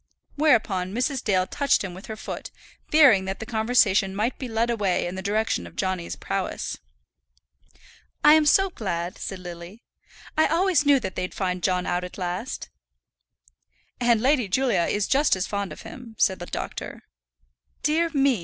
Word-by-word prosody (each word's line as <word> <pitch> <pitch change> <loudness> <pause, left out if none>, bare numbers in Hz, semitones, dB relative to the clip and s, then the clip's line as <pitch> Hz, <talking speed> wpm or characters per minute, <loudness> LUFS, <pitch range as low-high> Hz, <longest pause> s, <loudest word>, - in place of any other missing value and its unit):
Whereupon 210 -11 +2
Mrs. 255 +2 -1
Dale 185 -4 +2
touched 280 +4 +1
him 190 -3 -5
with 185 +3 -11
her 220 - -5
foot, 215 - -7 0.4
fearing 265 -11 +6
that 190 +1 -4
the 220 - -5
conversation 220 -4 +2
might 220 +5 -1
be 260 - -4
led 230 +1 0
away 200 -6 0
in 175 - -4
the 190 - -5
direction 210 +3 -1
of - - -15
Johnny's 185 -3 -2
prowess. - - -4 1.4
"I 300 - +8
am 310 -1 +4
so 390 +5 +4
glad," 175 - -4
said 195 - -5
Lily. 180 +4 -10 0.5
"I 315 - +4
always 335 -3 +2
knew 280 -2 +6
that 190 -6 -5
they'd 185 0 -4
find 180 -2 -2
John 180 -1 0
out 180 0 -1
at 180 - -8
last." 185 +7 -4 1.3
"And 240 -2 +3
Lady 260 -3 +2
Julia 235 -3 +1
is 205 -1 0
just 280 -2 +3
as 185 0 -2
fond 200 -2 -3
of - - -10
him," 225 0 -11
said 190 -2 +2
the 175 - -7
doctor. - - -6 0.8
"Dear 325 +3 +2
me!" 275 -6 +2
215 Hz, 170 wpm, -25 LUFS, 185-265 Hz, 1.4 s, I